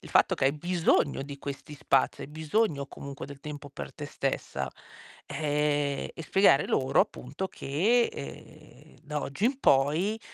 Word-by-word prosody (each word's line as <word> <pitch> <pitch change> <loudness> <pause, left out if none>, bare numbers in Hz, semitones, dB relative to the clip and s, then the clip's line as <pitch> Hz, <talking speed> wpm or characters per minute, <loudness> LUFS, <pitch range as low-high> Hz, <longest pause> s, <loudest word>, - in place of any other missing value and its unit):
il - - -12
fatto - - +5
che - - -1
hai 140 - +3
bisogno 160 -3 +1
di 140 0 -8
questi 140 +2 -7
spazi, 135 -1 +1
hai - - -6
bisogno 155 0 0
comunque 140 0 -8
del 140 -1 -10
tempo 145 -1 -7
per - - -8
te 150 - -6
stessa, 70 - -2 0.6
ehm, 145 -2 0
e - - -7
spiegare 190 -4 +4
loro 130 -1 +3
appunto 145 +10 -2
che, 210 - +2
ehm, 70 0 -11
da 150 0 -3
oggi 165 +11 0
in 265 +1 0
poi, 160 +11 +3
145 Hz, 155 wpm, -29 LUFS, 140-165 Hz, 0.6 s, fatto